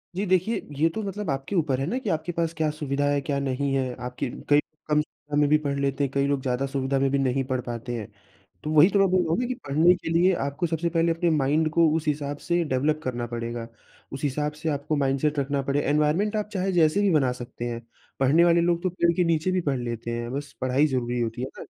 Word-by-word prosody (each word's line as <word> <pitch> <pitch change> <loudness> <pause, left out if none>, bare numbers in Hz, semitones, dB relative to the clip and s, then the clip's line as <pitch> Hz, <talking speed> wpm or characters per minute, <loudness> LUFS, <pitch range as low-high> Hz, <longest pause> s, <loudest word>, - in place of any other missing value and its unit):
जी 200 - -1
देखिए, 185 +4 +2 0.2
ये 160 - +4
तो 220 +7 -4
मतलब 200 -1 -4
आपके 135 +8 -3
ऊपर 145 -6 +1
है 135 - -1
ना 240 +9 -1
कि 220 - -4
आपके 160 +1 -1
पास 165 -1 -1
क्या 155 -1 +1
सुविधा 145 -2 -2
है, 145 - +2
क्या 140 +1 -2
नहीं 140 0 -1
है। 130 -2 -1
आपकी 125 +1 -4 0.2
कई 145 0 +6
कम 150 0 -2
सुविधा 150 -1 -8
में 145 - +4
भी 155 - +5
पढ़ 140 0 -1
लेते 140 0 0
हैं, 135 - -1
कई 140 0 +2
लोग 140 -1 0
ज़्यादा 130 +1 -1
सुविधा 135 0 -1
में 135 0 +2
भी 140 - +2
नहीं 135 0 +1
पढ़ 130 -1 0
पाते 120 0 -5
हैं। 105 -3 -6 0.6
तो, 150 - -3
वही 155 +4 +7
तो 200 - +2
मैं 195 - +5
बोल 185 0 +4
रहा 165 - -2
हूँ 250 - -1
कि 255 - -1
पढ़ने 160 +6 +5
के 175 - -6
लिए 175 +3 +4
आपको 140 +5 -2
सबसे 165 +1 -1
पहले 165 0 +2
अपने 165 +1 +1
माइंड 155 +1 +2
को 165 0 +5
उस 160 -1 -2
हिसाब 145 -1 -1
से 175 0 +2
डेवलप 150 +2 0
करना 120 -2 -3
पड़ेगा। 115 0 -5 0.5
उस 135 - -6
हिसाब 150 +1 -1
से 160 - -1
आपको 145 +1 -1
माइंडसेट 140 +1 +1
रखना 140 0 -1
पड़े 140 +1 0
एनवायरनमेंट 150 +9 +1
आप 210 0 -2
चाहे 190 0 0
जैसे 170 +2 +3
भी 200 -2 +3
बना 135 -5 +3
सकते 120 -1 -7
हैं। 120 -1 -4 0.4
पढ़ने 145 +6 +5
वाले 170 0 +4
लोग 170 0 +1
तो 185 - +1
पेड़ 170 -1 +2
के 180 - +2
नीचे 165 +1 +1
भी 185 0 +1
पढ़ 135 - 0
लेते 120 -1 -4
हैं। 120 0 -4
बस 145 +1 -5
पढ़ाई 130 +4 +3
ज़रूरी 125 -3 -1
होती 115 +1 -3
है 130 - -2
ना? - - -7
145 Hz, 255 wpm, -25 LUFS, 135-170 Hz, 0.6 s, वही